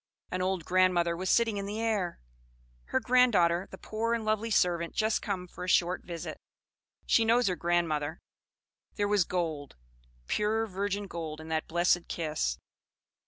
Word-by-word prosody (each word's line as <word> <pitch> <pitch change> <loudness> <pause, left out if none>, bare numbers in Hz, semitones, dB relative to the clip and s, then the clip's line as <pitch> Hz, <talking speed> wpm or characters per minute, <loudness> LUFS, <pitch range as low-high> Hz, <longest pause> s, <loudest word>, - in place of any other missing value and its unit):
An 185 - -2
old 185 -3 -1
grandmother 180 -2 +3
was 185 +2 -3
sitting 225 -3 +3
in 200 0 -3
the 210 +2 -4
air; 210 -6 -1 0.7
her 260 - 0
grand 250 0 +4
daughter, 175 0 +3
the 190 - -10
poor 230 +3 -1
and 225 -2 -4
lovely 215 +1 0
servant 175 -5 +1
just 220 0 +1
come 185 -3 -3
for 180 - -9
a 180 - -3
short 180 +1 +2
visit. 170 -2 -6 0.7
She 230 - +4
knows 235 +2 +3
her 180 - +1
grandmother. 170 -3 0 0.8
There 205 -1 0
was 205 -3 +3
gold, 160 -6 -3 0.5
pure 215 - 0
virgin 200 0 -2
gold 160 -4 -6
in 160 0 -9
that 160 -1 -1
blessed 175 +1 +2
kiss. 150 - -2
185 Hz, 165 wpm, -30 LUFS, 170-215 Hz, 0.8 s, grand